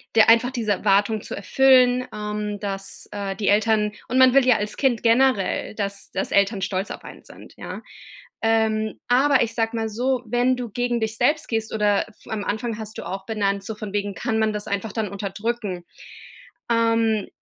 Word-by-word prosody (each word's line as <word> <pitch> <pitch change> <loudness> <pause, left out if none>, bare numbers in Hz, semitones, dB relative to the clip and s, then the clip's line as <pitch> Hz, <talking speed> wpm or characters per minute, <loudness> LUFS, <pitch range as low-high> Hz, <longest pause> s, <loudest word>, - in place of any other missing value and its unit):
der 220 - +6
einfach 230 +3 +5
diese 225 -5 0
Erwartung 205 +2 +2
zu - - -8
erfüllen, 255 +3 +4
ähm, 210 -1 -4
dass, 195 -1 -4
äh, 200 -1 -4
die 210 - -2
Eltern 210 0 +2 0.2
und 255 - 0
man 260 -1 +6
will 275 -2 +5
ja 250 -3 +5
als 210 0 -2
Kind 255 -5 +1
generell, 235 -4 +2
dass 200 -1 -4
dass - - -3
Eltern 200 0 +2
stolz 190 +1 -2
auf - - -9
einen - - -11
sind. - - -14
Ja, - - -8 0.6
ähm, 220 -1 +1
aber 270 +3 +4
ich 230 0 -4
sage 225 0 -1
mal 225 0 -1
so, 250 +3 -1
wenn 245 +3 +1
du 245 -2 -5
gegen 245 +2 -1
dich 220 0 -2
selbst 295 +5 +1
gehst 225 -1 -2
oder 210 -2 +1
f 210 - -21
am 215 -2 -3
Anfang 220 +2 -3
hast 220 0 -8
du - - -6
auch 195 0 -5
benannt, 200 -2 -1
so 220 +2 -5
von 210 -1 -7
wegen: 205 -1 -2
Kann 225 -3 -2
man 220 0 +2
das 210 0 -4
einfach 200 +2 -3
dann 220 -2 -1
unterdrücken? 200 -1 -4 0.9
Ähm, 230 -2 +2
220 Hz, 195 wpm, -23 LUFS, 205-240 Hz, 0.9 s, der